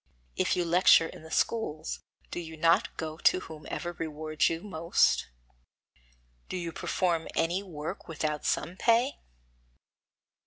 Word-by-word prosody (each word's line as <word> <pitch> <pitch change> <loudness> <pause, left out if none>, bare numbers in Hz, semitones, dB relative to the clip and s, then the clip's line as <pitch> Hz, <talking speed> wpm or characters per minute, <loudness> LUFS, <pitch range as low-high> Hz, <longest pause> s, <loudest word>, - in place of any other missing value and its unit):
If - - +1
you 175 - 0
lecture 170 -1 +6
in 165 - -9
the 160 - -12
schools, 160 -7 -1 0.3
do - - -3
you 160 -2 -8
not 165 +2 +3
go 155 -1 -4
to - - +4
whomsoever 160 +2 -6
rewards 155 -1 0
you 165 0 -3
most? 170 -4 +2 1.2
Do - - -3
you 170 -2 -3
perform 170 0 0
any 175 +4 +1
work 155 -6 -6
without 150 -2 -2
some 180 +2 -1
pay? 235 +6 +3
165 Hz, 130 wpm, -29 LUFS, 160-180 Hz, 1.2 s, lecture